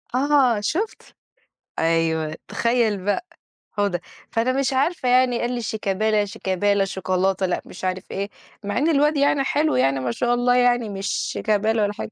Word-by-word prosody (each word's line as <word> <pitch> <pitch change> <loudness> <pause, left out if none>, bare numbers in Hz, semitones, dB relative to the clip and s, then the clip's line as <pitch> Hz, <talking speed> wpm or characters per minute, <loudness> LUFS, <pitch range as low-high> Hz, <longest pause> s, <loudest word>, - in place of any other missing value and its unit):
آه 265 -4 +3
شُفت، 370 - -3 0.6
أيوه 160 -1 +1
تخيل 230 -5 0
بقى، 205 - -1 0.5
حودة، 200 -4 -1 0.3
فأنا 235 +3 +1
مش 270 0 0
عارفة 270 +1 0
يعني، 250 -1 +3
قال 240 +1 -1
لي 240 - -3
شيكابالا، 215 0 0
شيكابالا، 195 +1 0
شوكولاتة، 190 0 0
لأ 180 - -2
مش 185 - -10
عارف 185 0 -3
إيه، 200 +1 -3 0.3
مع 205 0 -2
إن 300 +5 +2
الواد 300 0 +3
يعني 280 -1 +2
حلو 300 +3 +1
يعني 135 +1 +2
ما 125 -2 -2
شاء 240 - 0
الله 245 0 +2
يعني، 245 -2 +3
مش 195 0 -5
شيكابالا 215 +2 0
ولا 205 0 +1
حاجة. 210 - -6
215 Hz, 165 wpm, -22 LUFS, 190-250 Hz, 0.6 s, آه